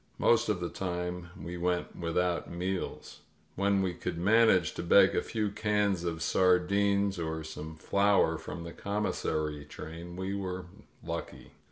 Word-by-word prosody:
Most 115 -2 +3
of 105 -4 +1
the 85 -1 -3
time 90 -1 -4
we 90 +1 -6
went 90 0 -1
without 85 +1 -1
meals. 90 +2 -4 0.4
When 100 0 +2
we 90 -2 -1
could 85 0 -4
manage 95 -2 +4
to - - -4
beg 85 - +6
a - - +2
few 105 -2 -2
cans 105 -4 +1
of 80 -1 -2
sardines 100 +2 +3
or 80 -1 -3
some 80 0 -7
flour 100 +5 +2
from 85 - -7
the 85 - -7
commissary 80 -7 -2
train 85 +4 -9
we 95 +1 -3
were 95 -2 -4 0.4
lucky. - - -6
90 Hz, 150 wpm, -30 LUFS, 85-100 Hz, 0.4 s, beg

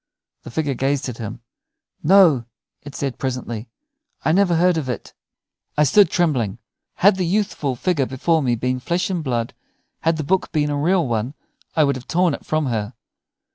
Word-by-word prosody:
The - - -10
figure 145 +1 -1
gazed 135 +1 -1
at 120 - -8
him. 115 +1 -6 0.6
"No," 165 -8 +5 0.4
it 145 -1 -10
said, 135 -3 -3
presently, 125 -3 -4 0.6
"I - - +3
never 180 0 +3
heard 180 +1 +3
of 150 -5 -2
it." 125 - -5 0.6
I 150 - +5
stood 190 +6 +5
trembling. 135 - 0 0.4
Had 195 +1 +4
the 185 - 0
youthful 175 -7 0
figure 145 -1 0
before 160 +5 +1
me 125 -4 +1
been 125 +2 -1
flesh 175 +9 -1
and 175 -4 -2
blood, 120 -4 -2 0.5
had 165 0 +1
the 155 - -2
book 185 +6 0
been 150 -2 +1
a - - -1
real 165 +2 +2
one, 120 +4 -2 0.4
I 155 - +4
would 140 -2 +1
have 130 - -12
torn 175 -2 +2
it - - -8
from 155 -1 +1
her. 110 -2 -2
145 Hz, 180 wpm, -21 LUFS, 125-170 Hz, 0.6 s, No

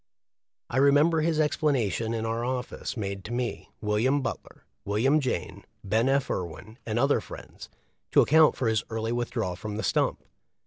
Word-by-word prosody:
I 120 - -3
remember 145 +4 +4
his 160 0 +1
explanation 130 - +1
in 110 0 -2
our 115 +1 -2
office 125 0 -4
made 100 -2 -4
to 110 - -6
me, 120 0 -3
William 115 +7 +1
Butler, 115 - -6 0.2
William 120 +9 +2
Jayne, 130 - -3 0.2
Ben. 110 +6 +1
F. 135 0 +2
Irwin, 95 - -5
and 110 0 -1
other 140 +4 +3
friends, - - -11 0.4
to - - +5
account 155 +1 +5
for 125 - -1
his 110 -2 +1
early 115 0 -2
withdrawal 120 -6 -2
from 105 +3 -6
the 110 - -3
stump. - - 0
120 Hz, 165 wpm, -27 LUFS, 110-140 Hz, 0.4 s, to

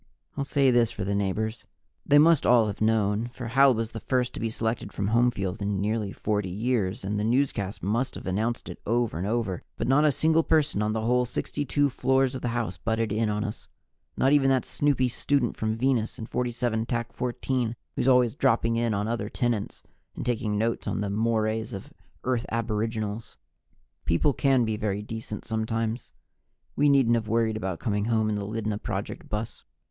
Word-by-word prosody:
I'll 140 - -1
say 140 -1 +3
this 120 -2 +4
for 105 - -5
the 100 +2 -1
neighbors 105 +3 -2 0.4
they 145 - +6
must 160 +1 +6
all 120 -2 +5
have 105 0 -5
known, 110 0 +2
for 120 -1 -7
Hal 135 +1 +5
was 115 0 -2
the 115 - -6
first 125 +1 0
to - - -6
be 115 - -1
selected 110 +1 -2
from 100 0 -2
Homefield 115 -4 +1
in 100 -1 -1
nearly 105 0 -1
40 105 -3 -1
years, 110 +1 -1
and 105 +2 -2
the - - -1
newscast 115 -4 0
must 120 +6 0
have - - -8
announced 110 +6 -1
it - - -8
over 115 -5 0
and 95 - -2
over, 110 -5 -1 0.2
but - - -2
not 135 +4 +4
a 150 - +5
single 160 +3 +3
person 155 -9 +1
on 105 0 0
the 110 - -1
whole 125 +2 +2
62 145 +3 -1
floors 130 0 +2
of 130 - -5
the - - -2
house 100 -7 -2
butted 110 +3 -1
in 110 +1 +1
on 105 0 -1
us. 105 - -6 0.5
Not 135 +2 +3
even 135 -2 +4
that 130 -1 +2
snoopy 140 -3 +1
student 125 +1 0
from 110 0 -2
Venus 125 -3 0
in 110 - -6
47 120 -2 -1 0.2
14, 125 -1 -2 0.2
who's 125 - 0
always 125 -3 +5
dropping 115 -5 +2
in 115 -2 +1
on 100 +1 -1
other 115 -3 -2
tenants 120 -5 -2 0.3
and - - -5
taking 110 -4 -1
notes 115 +2 -1
on - - -1
"the 100 -1 -2
mores 110 +1 0
of 95 - -8 0.3
Earth 125 -2 -1
Aboriginals." 110 -1 -2 0.7
People 85 - +2
can 135 -3 +3
be 110 -1 -1
very 105 -1 -2
decent 110 -1 -6
sometimes. 110 +1 -2 0.6
We 145 0 +4
needn't 135 -4 +4
have 115 -2 0
worried 110 0 +1
about 95 -5 -3
coming 105 -3 -1
home 110 -1 +1
in 105 - 0
the 100 -1 -3
Lydna 110 -1 -2
Project 100 -3 -5
bus. 105 +1 -4
115 Hz, 195 wpm, -27 LUFS, 105-125 Hz, 0.7 s, they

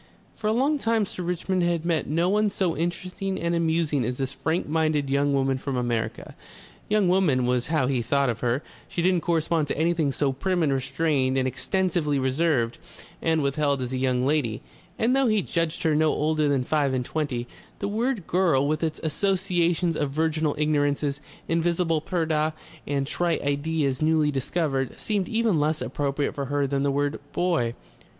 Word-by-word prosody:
For 215 - -3
a - - +3
long 275 +6 +2
time 225 -3 +1
Sir 185 - -5
Richmond 180 +1 -1
had 170 -1 0
met 170 -2 0
no 165 +4 +1
one 210 +2 +2
so 185 -4 -1
interesting 180 +4 -3
and 170 0 -1
amusing 160 -4 +1
as 125 +2 -2
this 135 -1 -3
frank 165 +3 -1
minded 155 -3 +1
young 140 +1 +2
woman 135 -1 +1
from 140 -1 -3
America. 115 -2 -2 0.5
"Young 210 -2 +3
woman" 175 -9 +3
was 125 0 0
how 155 -3 +1
he 130 -2 0
thought 140 +4 +1
of 115 -3 -1
her; 125 +3 0 0.2
she 175 -3 -3
didn't 180 -1 +3
correspond 165 -2 +1
to - - -3
anything 160 -2 +1
so 140 0 0
prim 175 +6 0
and 140 -3 +2
restrained 135 0 0
and 130 -1 +1
extensively 150 +3 0
reserved 130 -3 +1 0.4
and 160 -2 +1
withheld 140 0 +1
as 125 0 -4
a - - -1
"young 130 -1 +1
lady 140 -7 0 0.2
"; 175 0 -29
and 240 +4 +2
though 270 -1 +3
he 215 -3 +2
judged 165 -2 -1
her 160 - +3
no 155 0 +3
older 155 0 +1
than 140 -3 +1
five 140 -1 +1
and 125 -1 -1
twenty, 135 -6 -2 0.3
the 200 - -3
word 225 -1 -1
"girl" 165 -7 +2
with 155 +2 -1
its 160 -1 -1
associations 175 0 +1
of 145 -2 -1
virginal 155 +1 0
ignorances, 145 -1 0 0.3
invisible 165 -1 +1
purdah, 155 -3 0 0.3
and 140 -1 0
trite 170 +4 -1
ideas 145 -1 0
newly 155 -1 +3
discovered, 135 -1 -1
seemed 205 -4 -1
even 225 -7 +2
less 155 +1 +1
appropriate 140 0 -2
for 140 - -3
her 145 +1 0
than 135 0 -1
the 140 - +1
word 145 +1 0
"boy." 165 -10 0
155 Hz, 185 wpm, -25 LUFS, 140-175 Hz, 0.5 s, a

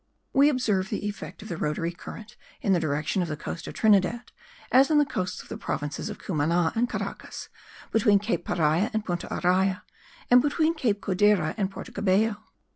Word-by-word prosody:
We 280 +2 +6
observe 215 -8 0
the 210 - -3
effect 205 0 -6
of - - -9
the 170 - -4
rotatory 155 +3 -1
current 210 +5 -10 0.2
in 195 - +1
the 175 - +3
direction 150 +3 -1
of 175 - -1
the 150 -1 -4
coast 165 +2 -6
of - - -7
Trinidad, 220 +2 +2 0.4
as 265 +2 +6
in 310 - +4
the 295 - +5
coasts 185 -9 -3
of - - -18
the - - -6
provinces 145 -1 -3
of - - -6
Cumana 165 0 0
and 240 +2 +1
Caracas, - - -6 0.4
between 210 -2 +4
Cape 195 -4 -1
Paria 165 +5 +1
and 220 0 -1
Punta 175 -2 -3
Araya 185 +1 +1 0.5
and 245 0 +8
between 310 +3 +1
Cape 225 -10 0
Codera 190 -4 +2
and 195 -4 -1
Porto 195 - -9
Cabello. 205 +2 +1
195 Hz, 190 wpm, -26 LUFS, 175-225 Hz, 0.5 s, and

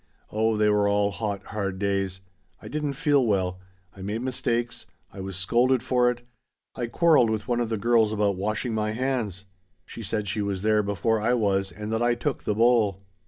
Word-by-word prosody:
Oh 110 0 +1
they 105 0 +3
were 105 -1 +3
all 100 0 +2
hot, 100 -2 -3
hard 100 -2 -3
days. 95 -1 -1 0.4
I - - -11
didn't 150 -2 -2
feel 145 -1 +2
well. 95 -5 0 0.4
I 95 - -11
made 105 +5 -3
mistakes. 120 -2 -2 0.3
I - - -10
was 95 -1 -5
scolded 120 +6 +2
for 125 -1 +3
it. 120 0 -4 0.5
I 120 -2 -3
quarreled 155 -3 +4
with 110 -1 -2
one 120 -1 +1
of 120 -2 -1
the 110 - -1
girls 115 0 +3
about 105 -2 +1
washing 105 +5 -2
my 105 0 -1
hands! 115 -6 -2 0.4
She - - -9
said 105 -2 -2
she 105 +2 -1
was 100 -1 -2
there 110 0 +3
before 105 +2 0
I 120 +3 +2
was 95 -4 +1
and 105 +4 -5
that 115 - 0
I 120 0 +3
took 130 +4 -3
the 105 - 0
bowl. 110 -4 +3
110 Hz, 200 wpm, -26 LUFS, 100-120 Hz, 0.5 s, quarreled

